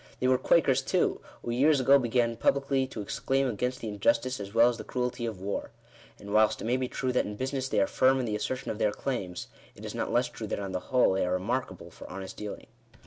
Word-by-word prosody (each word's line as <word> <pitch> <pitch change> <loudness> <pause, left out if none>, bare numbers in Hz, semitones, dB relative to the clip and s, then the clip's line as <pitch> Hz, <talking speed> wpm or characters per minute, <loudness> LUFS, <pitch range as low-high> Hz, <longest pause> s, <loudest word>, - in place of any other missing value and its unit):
They 130 - +1
were 130 0 +4
Quakers 135 -5 +3
too, 180 +6 0 0.2
who 120 - -3
years 140 +4 +4
ago 135 +2 +6
began 120 -1 +1
publicly 135 +2 +1
to 115 -5 -6
exclaim 135 +6 0
against 125 +2 -2
the 115 - -4
injustice 115 +5 +1
as 100 -1 -6
well 115 +2 +6
as 120 -1 -1
the - - -5
cruelty 125 -1 -2
of 110 -5 -5
war. 100 +2 -3 0.5
And, 100 0 -8
whilst 110 0 +4
it - - -5
may 120 +2 +2
be 130 0 -1
true 130 +1 -2
that 125 - +2
in 105 - -5
business 130 +2 -2
they 105 - +1
are 100 - +4
firm 130 +5 +3
in 125 - -1
the 105 -2 -2
assertion 130 +5 -3
of 105 - -6
their 105 - +2
claims, 95 - -4 0.3
it - - -10
is - - -5
not - - -2
less - - +2
true - - -7
that - - -3
on 100 -1 -4
the 90 - -2
whole 125 -5 +4
they 95 - +1
are 90 +1 +1
re 90 - -7
markable 125 +3 -3
for - - -12
honest 95 0 -7
dealing. 105 -1 -7
120 Hz, 255 wpm, -29 LUFS, 105-130 Hz, 0.5 s, ago